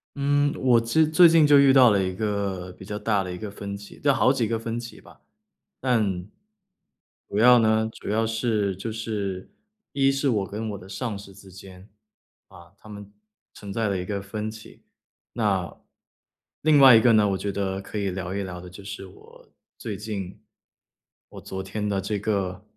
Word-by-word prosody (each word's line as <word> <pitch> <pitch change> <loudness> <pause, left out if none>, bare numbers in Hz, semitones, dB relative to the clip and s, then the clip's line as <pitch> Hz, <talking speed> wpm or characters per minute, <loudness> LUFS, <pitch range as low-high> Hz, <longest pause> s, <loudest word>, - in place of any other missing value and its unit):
嗯， 145 0 +1
我 125 -3 +4
其 115 0 -5
实 - - +1
最 160 +3 +7
近 165 -2 +5
就 145 -1 +6
遇 140 -1 +6
到 130 -3 +7
了 100 -2 +2
一 95 0 -2
个 100 -3 -3
比 95 - -13
较 105 +1 -5
大 105 -2 0
的 90 -1 -6
一 - - -6
个 105 +2 -6
分 100 0 -7
歧， 100 0 -12
就 140 -1 +3
好 130 - +3
几 125 -5 0
个 115 +1 -2
分 115 +1 -4
歧 120 0 -10
吧。 - - -18 0.6
但 105 -8 0 1.0
主 100 - -3
要 125 +2 +7
呢， 110 0 +2
主 - - -9
要 110 +2 +1
是 110 -3 -1
就 105 +5 -5
是 105 -4 -5 0.4
一 135 -1 +3
是 135 0 0
我 105 -5 0
跟 110 +3 -5
我 100 - -6
的 95 - -13
上 115 -1 -4
司 100 -1 -12
之 95 -1 -15
间， 95 +1 -14 0.6
啊， 85 +2 -16
他 - - -17
们 100 -1 -10 0.4
存 100 -1 -8
在 115 -1 -1
的 100 - -1
一 90 - -5
个 100 +1 -3
分 105 +2 -5
歧。 110 0 -14 0.5
那 100 -6 -1 0.9
另 155 -1 +4
外 135 -3 +9
一 110 - +6
个 120 - +5
呢， 105 -1 +4
我 95 - 0
觉 100 +1 -3
得 95 -1 -3
可 100 - -8
以 100 -2 -1
聊 90 0 -5
一 100 - -2
聊 90 -2 -7
的 90 - -11
就 90 +3 -12
是 100 0 -8
我 90 - -18 0.3
最 105 -3 -5
近 100 -3 -6 0.9
我 - - -11
昨 95 0 -6
天 105 +2 -4
的 100 -1 -1
这 100 +2 -3
个， 100 -2 -2
105 Hz, 215 characters per minute, -24 LUFS, 95-115 Hz, 1.0 s, 外